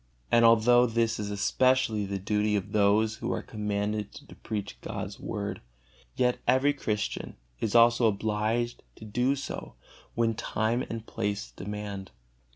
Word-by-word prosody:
And 115 0 +5
although 120 +2 +6
this 115 -1 0
is 105 -1 -3
especially 110 +1 +2
the 100 0 -2
duty 105 +2 0
of 100 0 -2
those 105 +1 +3
who - - -3
are - - -2
commanded 105 -1 -2
to - - -12
preach 105 -2 -5
God's - - -5
Word, - - -4 0.5
yet 125 -1 +1
every 130 +3 +4
Christian 105 -7 -3 0.2
is 110 -1 -1
also 115 0 +6
obligated 110 +3 -1
to 110 - -11
do 125 +6 +1
so 140 - -6 0.4
when 115 -1 +2
time 110 +3 -1
and 115 -1 -5
place 105 -3 -3
demand. 100 0 -6
110 Hz, 145 wpm, -28 LUFS, 105-115 Hz, 0.5 s, although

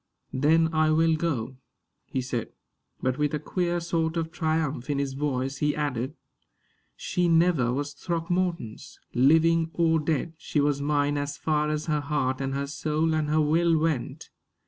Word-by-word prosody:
"Then 160 +4 +3
I 155 0 +3
will 160 +1 +3
go," 135 -6 -2 0.5
he 130 - -2
said. 125 -2 -4 0.5
But 130 +1 0
with 150 0 +1
a - - -2
queer 175 +2 -1
sort 165 -1 -1
of 165 -1 -2
triumph 155 -5 -1
in 145 - 0
his 140 -1 -1
voice 135 -1 -2
he 150 +1 0
added: 140 -1 -2 0.8
"She 180 -2 -1
never 165 -7 +3
was 145 +3 -3
Throckmorton's, 170 -6 -3
living 160 +5 +4
or 165 -1 +3
dead. 155 +1 -1
She 150 - -1
was 145 -1 +1
mine 145 0 +1
as 145 0 -4
far 150 -1 0
as 150 0 -2
her 150 -2 0
heart 140 -2 -1
and 135 0 -2
her 140 0 -1
soul 155 +3 -1
and 155 -1 0
her 155 +1 +3
will 165 +2 +3
went." 155 -5 -2
150 Hz, 165 wpm, -26 LUFS, 140-165 Hz, 0.8 s, living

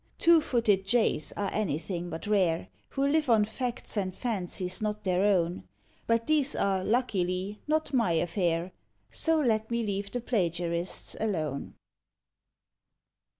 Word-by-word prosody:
Two 335 -1 +6
footed 225 -8 +2
Jays 220 -8 +2
are 200 -1 -1
anything 175 -2 -2
but 160 - -6
rare, 185 -5 +1 0.2
Who 275 0 0
live 300 -1 +2
on 220 -3 +5
facts 245 +3 -4
and 190 -3 -2
fancies 185 -4 -3
not 210 0 -2
their 185 -1 +1
own; 175 - +1 0.4
But 230 0 +2
these 295 -3 +2
are, 190 -1 +1
luckily, 200 -4 0
not 310 -1 0
my 230 -9 +3
affair, 170 +1 0 0.4
So 325 -1 +2
let 220 -6 +1
me 235 0 0
leave 200 0 -2
the 245 - -3
plagiarists 175 -6 -1
alone. 155 -10 -2
205 Hz, 135 wpm, -29 LUFS, 180-235 Hz, 0.4 s, Two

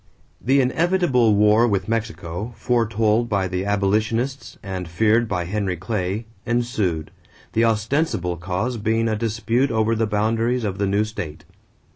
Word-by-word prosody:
= - - -38
The 140 0 +6
inevitable 130 - +2
war 105 +3 +5
with 100 -4 0
Mexico, 110 -2 -3
foretold 115 -1 +1
by 100 -2 +1
the 90 +1 -3
abolitionists 110 +6 -1
and 95 -3 -5
feared 110 +7 +2
by 90 -4 -2
Henry 95 -1 -2
Clay, 100 +3 -2 0.2
ensued, 110 -10 -1 0.4
the 115 +1 +3
ostensible 110 - 0
cause 95 +8 -2
being 115 +1 0
a 110 - 0
dispute 115 +4 0
over 110 0 +1
the 115 0 0
boundaries 115 +4 0
of 100 -2 -3
the 100 - +1
new 100 +2 +2
state. 90 -8 -6
110 Hz, 145 wpm, -22 LUFS, 100-115 Hz, 0.4 s, The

